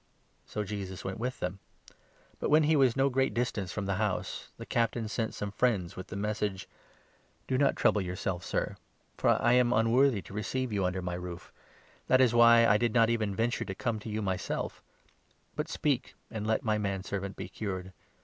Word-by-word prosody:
So 105 - -3
Jesus 95 -2 -6
went 95 +2 -4
with 125 +2 -3
them. 90 +2 -3 0.8
But, - - -1
when 155 +2 +6
he 155 +1 +3
was 130 -5 +4
no 135 +1 +4
great 135 0 +1
distance 115 -6 -1
6 - - -6
from 105 - -2
the 100 -1 -1
house, 105 -4 -2
the - - -8
Captain 115 -1 0
sent 110 +1 -2
some 105 -1 -4
friends 105 -6 0
with 95 - -7
the - - -7
message 105 -1 -2 0.2
— - - -32
" - - -38
Do 130 - 0
not 140 +1 +3
trouble 105 - +3
yourself, 90 -1 -3
Sir; - - -2 0.4
for - - +3
I 120 - +3
am 125 -1 +4
unworthy 115 0 +3
to - - -12
receive 115 +4 -2
you 100 -2 +1
under 90 0 -1
my 90 0 -3
roof. 90 -1 -7 0.6
That 130 - +5
was 125 -3 +5
why 115 0 +7
I 105 - +5
did 120 -1 0
not 115 -1 +5
even 110 -4 0
venture 115 +3 0
to 95 - -5
7 - - -16
come 120 -4 -1
to 110 - -8
you 110 0 -2
myself; 95 -1 -3 0.7
but 150 +2 -3
speak, 140 -6 -1 0.2
and 110 -1 -4
let 110 - +1
my 110 -2 +1
manservant 100 -1 -3
be - - -6
cured. 95 -3 -5
110 Hz, 205 wpm, -30 LUFS, 95-120 Hz, 0.8 s, why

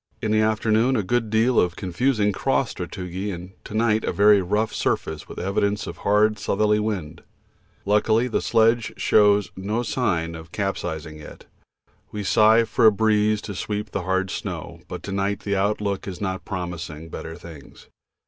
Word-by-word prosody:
In 110 - -2
the 110 0 +3
afternoon 110 +3 +2
a 105 - +1
good 115 +3 0
deal 115 +3 +3
of 90 -1 +1
confusing 105 +3 0
cross 95 - 0
sastrugi, 95 +2 -5
and 90 +1 -8
to 105 - -8
night 110 -1 +2
a - - -1
very 100 0 +5
rough 105 +4 0
surface 80 -1 -2
with - - -9
evidences 100 +3 -1
of - - -7
hard 105 +1 +2
southerly 105 +2 +1
wind. 90 -7 -3 0.6
Luckily 110 +3 +2
the 125 - -1
sledge 115 0 +2
shows 105 -1 +3
no 105 +5 -2
signs 85 -11 -1
of 80 +1 -11
capisizing 80 -6 -4
yet. 75 - -12 0.7
We 105 -1 -4
sigh 110 +3 +5
for 115 0 +3
a - - +8
breeze 105 0 +2
to 105 - -5
sweep 105 +2 -4
the 100 - -2
hard 95 +1 -1
snow, - - -6
but - - -7
to 100 - -6
night 100 +1 -1
the 100 -1 -1
outlook 100 0 -1
is 90 -3 -6
not 95 -2 -3
promising 85 -4 -6
better 80 0 -7
things. 80 -6 -13
100 Hz, 170 wpm, -23 LUFS, 90-110 Hz, 0.7 s, a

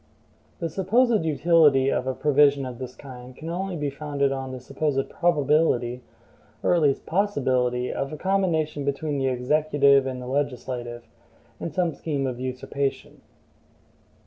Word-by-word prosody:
The 170 - -2
supposed 210 - +2
utility 150 -4 +4
of 130 - -1
a 130 - -1
provision 145 -1 +3
of 125 -1 -7
this 130 -1 -7
kind 125 -2 -11
can 160 +4 -7
only 185 +1 -3
be 145 -3 -2
founded 140 -1 -1
on 135 -1 -4
the 130 - -6
supposed 135 +1 -2
probability, 145 -7 +1 0.6
or - - +3
at 175 - +3
least 140 -3 +1
possibility, 130 -10 0
of 135 - -3
a 155 - -6
combination 165 -6 0
between 140 +1 -2
the 135 - 0
executive 140 +1 +3
and 130 -1 -4
the 125 - -7
legislative, 125 -3 -3 0.6
in 165 - -4
some 170 0 0
scheme 145 -4 -3
of 125 -2 -3
usurpation. 130 +2 -4
140 Hz, 145 wpm, -25 LUFS, 130-160 Hz, 0.6 s, utility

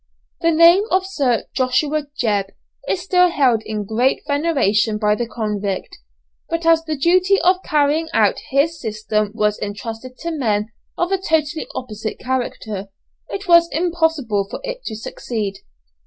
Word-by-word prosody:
The 335 - +3
name 335 +5 +6
of 375 0 +2
Sir 275 - 0
Joshua 285 +3 0
Jebb 205 -4 +1 0.4
is 365 - 0
still 360 -1 +4
held 260 -9 +2
in 215 -1 -4
great 235 +6 +1
veneration 275 -9 +1
by 210 -1 +2
the 235 +2 -2
convict, 210 -4 -3 0.5
but 330 0 -2
as 330 -1 +4
the 310 -2 -3
duty 365 +6 +3
of 365 +1 +3
carrying 300 +2 +1
out - - +2
his 305 +4 +1
system 215 -1 -1
was 210 -2 +1
entrusted 225 +5 -6
to 335 - -3
men 220 -8 0 0.3
of 350 +2 0
a 385 -1 +1
totally 320 -2 0
opposite 220 -3 -5
character, 230 -6 -3 0.4
it 395 0 -5
was 340 -1 +6
impossible 320 - 0
for - - -6
it - - -5
to 220 - -4
succeed. 215 -2 -4
275 Hz, 150 wpm, -20 LUFS, 215-335 Hz, 0.5 s, name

